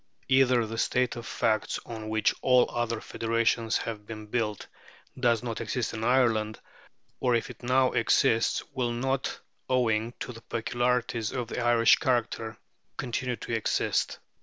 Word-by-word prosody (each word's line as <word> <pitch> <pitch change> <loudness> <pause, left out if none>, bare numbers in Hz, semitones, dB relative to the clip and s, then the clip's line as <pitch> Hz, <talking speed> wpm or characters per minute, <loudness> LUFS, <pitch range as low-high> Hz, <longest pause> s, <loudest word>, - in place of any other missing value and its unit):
Either 130 -3 +4
the 115 +1 -5
state 125 0 +1
of 120 0 -7
facts 110 -2 0
on 110 -2 -6
which 110 0 +2
all 125 -1 +5
other 120 -1 -1
federations 115 0 0
have 110 -2 -5
been 110 -1 -7
built 105 -2 -2 0.5
does 120 -3 +2
not 115 -2 -4
exist 115 +2 -2
in 110 - -4
Ireland, 115 -4 +2 0.6
or 125 -2 +2
if 115 - -1
it - - -15
now 130 +1 +3
exists, 115 -4 +2
will 125 -3 -1
not, 130 +2 -1 0.3
owing 115 -2 +1
to 125 - -4
the 115 - -12
peculiarities 120 -1 -1
of 120 -3 -4
Irish 120 -1 +5
character, 115 -3 -1 0.4
continue 125 0 -2
to 115 - -6
exist. 115 -2 0
115 Hz, 145 wpm, -28 LUFS, 110-125 Hz, 0.6 s, all